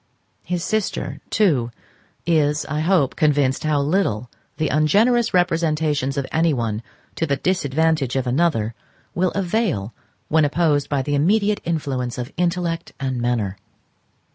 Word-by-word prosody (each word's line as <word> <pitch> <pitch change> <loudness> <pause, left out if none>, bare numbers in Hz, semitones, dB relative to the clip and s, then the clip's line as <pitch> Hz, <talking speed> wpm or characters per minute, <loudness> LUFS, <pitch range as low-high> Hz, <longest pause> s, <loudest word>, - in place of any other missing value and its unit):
His 175 -1 -2
sister, 215 0 -2
too, 150 - +2 0.6
is, 150 -3 +2
I 150 +1 -3
hope, 160 -4 +2
convinced 145 -3 +2
how 155 -2 +1
little 140 - 0 0.3
the 155 - 0
ungenerous 215 - +3
representations 155 -6 +1
of 140 - 0
anyone 120 -10 0 0.3
to 165 - -2
the 140 - +1
disadvantage 160 -5 0
of 130 -1 0
another 125 -5 +1 0.4
will 180 +1 +1
avail 180 - -1 0.3
when 160 0 +3
opposed 145 -1 +1
by 140 -2 0
the 145 - -2
immediate 200 +8 +2
influence 135 -7 -2
of 125 +2 -5
intellect 175 -1 -1
and 130 -3 -2
manner. 115 -5 -1
155 Hz, 130 wpm, -21 LUFS, 135-175 Hz, 0.6 s, ungenerous